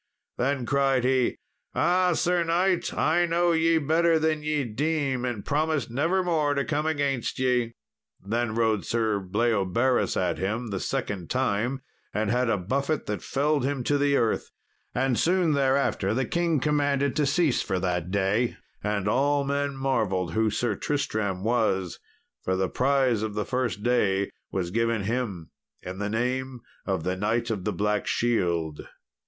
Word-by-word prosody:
Then 130 0 0
cried 135 -1 +2
he, 130 -1 +2 0.4
"Ah! 180 0 +3
Sir 175 +1 +1
knight, 175 +2 +1
I 175 0 +2
know 170 +1 +2
ye 165 0 +3
better 160 +2 +3
than 155 -1 0
ye 150 -1 0
deem, 135 +2 -1
and 120 -5 -4
promise 150 -5 0
nevermore 160 +1 +1
to 140 - 0
come 150 +1 -1
against 140 -5 -1
ye." 125 -3 +1 0.4
Then 110 +3 -2
rode 110 -3 +1
Sir 110 -3 0
Bleoberis 110 +4 +1
at 90 -3 0
him 110 +5 -2
the 95 - -2
second 105 -10 -3
time, 130 +1 0 0.3
and 105 0 0
had 125 0 +1
a 110 - +2
buffet 135 - -1
that 105 - -3
felled 145 0 0
him 135 -1 -1
to 145 +3 +1
the 140 0 +3
earth. 115 -4 0 0.5
And 130 -1 +1
soon 175 -2 +2
thereafter 135 -7 +1
the 130 +1 +1
king 170 +1 +1
commanded 140 -1 +1
to 150 -2 +2
cease 150 -2 +2
for 95 - -2
that 90 -1 -1
day, 100 +5 0 0.3
and 105 -2 -1
all 140 +5 +2
men 140 0 -1
marvelled 100 -10 0
who 110 +2 +2
Sir 110 +1 0
Tristram 105 -7 -2
was, 105 -6 0 0.4
for 95 - 0
the 95 0 0
prize 130 -4 +2
of 110 -1 -3
the 105 - -1
first 120 -6 -2
day 100 -5 +1 0.2
was 90 -2 -2
given 115 0 0
him 105 -7 -3 0.3
in 95 +1 -6
the 105 0 -2
name 125 +3 -2 0.3
of 95 -5 -1
the 90 +2 -1
Knight 115 +4 0
of 100 -5 -3
the 105 - +1
Black 105 0 0
Shield. 85 -10 0
125 Hz, 160 wpm, -26 LUFS, 105-145 Hz, 0.5 s, Ah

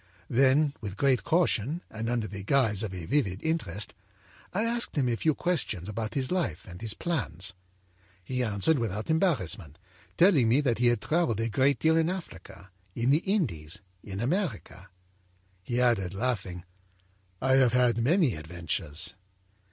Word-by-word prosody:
âThen, 135 +4 +4
with 105 -2 -6
great 135 -1 +2
caution 165 - +1
and 110 +1 -3
under 120 -2 0
the 100 -2 -7
guise 110 -4 +2
of 110 -4 -3
a 90 -3 -6
vivid 100 - 0
interest, 110 - -2 0.6
I 205 +4 0
asked 235 +1 -1
him 135 -3 +2
a 120 - +1
few 155 +5 +1
questions 135 - -1
about 110 +1 -4
his 135 +1 -1
life 170 - -1
and 90 -1 -10
his 110 -2 -3
plans. 115 - -2 0.7
He 125 +7 -2
answered 120 +6 +2
without 110 - -2
embarrassment, 95 - 0 0.4
telling 165 - +5
me 125 +5 +4
that 120 -6 0
he 125 - +4
had 120 -3 +2
travelled 155 - +1
a 115 +1 0
great 135 +6 +3
deal 160 0 +3
in 165 0 +2
Africa, 100 - -8 0.2
in 120 +3 +2
the 150 - +5
Indies, 105 - -1 0.3
in 100 -1 -6
America. 120 - -2 0.7
He 120 +6 -2
added, 105 -7 +2
laughing: 100 -6 -2 0.8
â'I 130 0 +4
have 125 -3 +4
had 125 -2 +3
many 145 - +3
adventures.' 80 0 -3
120 Hz, 160 wpm, -28 LUFS, 100-150 Hz, 0.8 s, telling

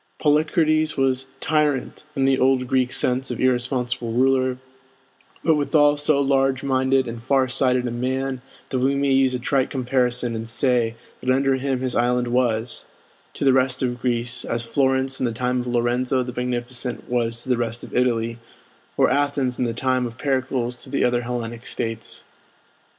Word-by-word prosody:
Polycrates 155 0 +2
was 135 0 +1
"tyrant," 150 -2 0
in 135 -2 +1
the 135 -1 +3
old 130 -1 +3
Greek 130 -1 +1
sense 130 0 0
of 125 - -4
irresponsible 125 -1 0
ruler; 130 +1 +2 0.9
but 160 - +4
withal 145 0 +3
so 145 0 +2
large 135 -1 +1
minded 130 -1 +1
and 115 0 -6
far 130 +1 +2
sighted 125 0 +1
a 120 - -2
man 130 +2 -2 0.3
that 130 - 0
we 135 +2 +2
may 140 0 +1
use 135 -1 +3
a - - -3
trite 130 +1 0
comparison 125 -2 0
and 115 0 -5
say 120 -2 +1 0.2
that 130 - -4
under 135 +1 +2
him 130 -1 -2
his 130 -2 -2
island 120 0 +1
was, 120 -2 0 0.5
to - - -2
the 135 - +5
rest 130 0 +2
of 120 -1 -2
Greece, 120 -1 +1
as 115 0 -2
Florence 130 +2 +1
in 130 - +1
the - - -2
time 125 +2 -1
of 125 - -7
Lorenzo 125 +2 +1
the 125 0 -6
Magnificent 125 0 -3
was 120 -1 -1
to - - -10
the 125 - +4
rest 115 0 -3
of - - -9
Italy, 115 -2 0 0.6
or - - +4
Athens 140 -3 0
in 125 - +1
the 120 - -1
time 130 +1 0
of 115 0 -11
Pericles 130 -3 -1
to - - -9
the 140 - 0
other 120 0 +1
Hellenic 120 -1 -5
States. 115 -3 -4
130 Hz, 175 wpm, -22 LUFS, 120-135 Hz, 0.9 s, the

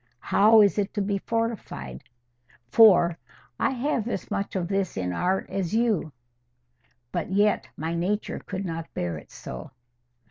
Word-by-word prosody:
How 215 +2 +6
is 205 0 +3
it 200 +1 -2
to 205 - 0
be 200 0 -1
fortified? 210 - -3 0.7
For, 175 -6 +6 0.4
'I - - +2
have 255 -3 -1
as 235 - -4
much 200 -1 -2
of 180 -2 -1
this 195 - -1
in 90 -1 -2
art 185 - 0
as 190 0 -2
you, 220 -9 +1 1.0
But - - -3
yet 205 +2 +2
my 160 +2 -3
nature 190 +5 -1
could 195 0 -5
not 165 -1 -5
bear 85 -3 -2
it - - -18
so. 60 - -8
195 Hz, 150 wpm, -26 LUFS, 165-210 Hz, 1.0 s, How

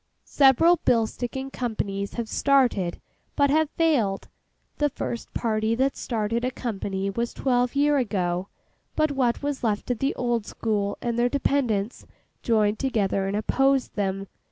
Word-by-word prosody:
Several 295 +6 +5
bill 230 -7 +2
sticking 265 +4 -5
companies 200 -5 -3
have 235 -2 -3
started, 245 -11 +2 0.4
but 285 -1 +3
have 310 0 +3
failed. 270 - 0 0.5
The 295 0 +3
first 235 -3 -5
party 220 0 0
that 270 +3 +1
started 230 0 -2
a 255 - +1
company 200 -5 -3
was 235 +4 -3
twelve 250 -1 +1
year 290 +1 +3
ago; 185 -6 -1 0.5
but 310 -1 +2
what 260 -2 0
was 285 -2 -3
left 215 +1 -1
of 240 - -2
the 270 +1 0
old 235 -4 -1
school 205 -3 -2
and 235 -1 -1
their 245 +1 +3
dependants 245 -6 -1 0.3
joined 215 -2 +2
together 200 -7 0
and 200 +1 -1
opposed 270 +4 +1
them. 195 -1 -2
235 Hz, 150 wpm, -25 LUFS, 205-270 Hz, 0.5 s, Several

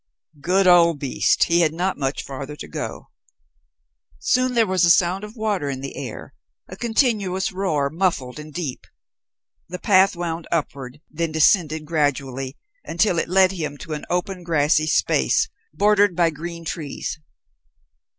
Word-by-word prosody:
Good 185 +5 +2
old 170 -3 +6
beast! 140 -2 +1
He 170 0 +2
had 160 -1 +1
not 185 +2 -1
much 135 0 -2
farther 140 +2 -7
to - - -9
go. - - -6 1.1
Soon 255 - +1
there 230 -1 +4
was 185 -3 +1
a 170 - +5
sound 180 +3 +3
of 210 +1 -9
water 210 - -1
in 135 -1 -4
the 135 - -6
air 130 -5 -7 0.3
a 185 - -9
continuous 210 -4 0
roar, 155 -8 -1
muffled 155 -7 -1
and 150 0 -9
deep. 150 -5 -5 0.8
The 180 - -5
path 190 0 +4
wound 170 -1 -4
upward, 140 -4 -3
then 165 +1 -2
descended 160 -1 +2
gradually 140 -4 -2 0.3
until 175 0 +1
it - - -2
led 190 0 +4
him 155 -6 -4
to 155 - -7
an 150 - -5
open, 180 +1 -2
grassy 155 -1 +2
space, 65 - +2 0.2
bordered 205 +2 +3
by 170 -1 +3
green 170 +2 -7
trees. 155 0 -5
170 Hz, 150 wpm, -22 LUFS, 150-185 Hz, 1.1 s, old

